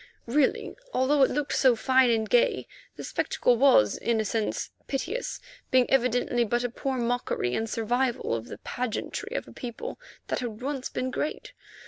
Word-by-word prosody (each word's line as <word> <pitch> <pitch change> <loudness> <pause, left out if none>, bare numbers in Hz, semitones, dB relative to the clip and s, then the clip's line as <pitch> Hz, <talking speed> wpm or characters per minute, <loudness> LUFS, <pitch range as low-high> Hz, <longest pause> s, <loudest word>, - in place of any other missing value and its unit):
Really, 270 +4 +1 0.2
although 275 +3 +3
it 265 - +6
looked 290 0 -1
so 255 -3 +5
fine 260 +2 +4
and 220 -2 +1
gay, 240 +2 +3 0.3
the - - -8
spectacle 245 - +1
was, 230 - +5
in 230 -1 0
a 220 - 0
sense, 220 0 -2 0.2
piteous, 385 - -3 0.3
being 255 -1 +4
evidently 245 -1 +2
but 240 +2 0
a 245 - 0
poor 265 +2 -2
mockery 240 - -1
and 225 - -1
survival 240 - 0
of 115 0 -3
the - - -8
pageantry 250 - -4
of - - -5
a - - -12
people 240 - -6 0.3
that - - 0
had 235 -2 -5
once 270 -1 -3
been 255 0 -3
great. 300 - -4
245 Hz, 170 wpm, -27 LUFS, 230-265 Hz, 0.3 s, it